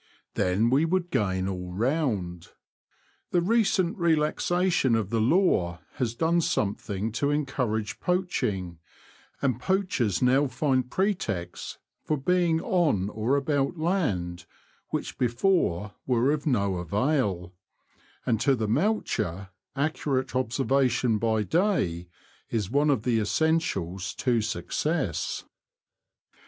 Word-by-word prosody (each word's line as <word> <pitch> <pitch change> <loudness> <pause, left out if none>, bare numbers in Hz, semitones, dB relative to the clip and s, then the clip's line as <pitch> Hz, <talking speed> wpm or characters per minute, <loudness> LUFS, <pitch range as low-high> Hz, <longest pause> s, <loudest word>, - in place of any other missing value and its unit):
Then 100 +6 +1
we 140 +4 +4
would 175 +1 0
gain 95 -2 0
all 90 -2 -5
round. 105 - -1 0.8
The 175 - +2
recent 195 -2 +2
relaxation 165 -2 +2
of 110 -3 -1
the 115 -1 +1
law 110 - +2 0.2
has 120 -4 -1
done 165 +4 +2
something 105 - -1
to 140 +6 0
encourage 125 -7 -1
poaching, 115 - -1 0.6
and 130 -3 +1
poachers 135 - 0
now 130 +3 +3
find 130 -2 0
pretexts 120 - -2 0.3
for 155 - 0
being 170 +3 +2
on 150 - +1
or 110 +6 0
about 140 +2 0
land 95 - -1 0.4
which - - -4
before 120 - +1
were 125 +2 +3
of 150 +1 -2
no 100 -8 +1
avail, 100 - 0 0.7
and 115 -3 +1
to 135 +2 +3
the 110 -3 -2
moucher 110 - -1 0.3
accurate 135 -3 -1
obser 130 +1 0
vation 125 -4 +2
by 110 -1 +1
day 155 - 0 0.4
is 105 -3 -2
one 145 +3 +3
of 130 -7 +1
the 120 -3 +2
essentials 105 - 0
to 120 -3 +1
success. 110 - -2
125 Hz, 115 wpm, -27 LUFS, 100-155 Hz, 0.8 s, we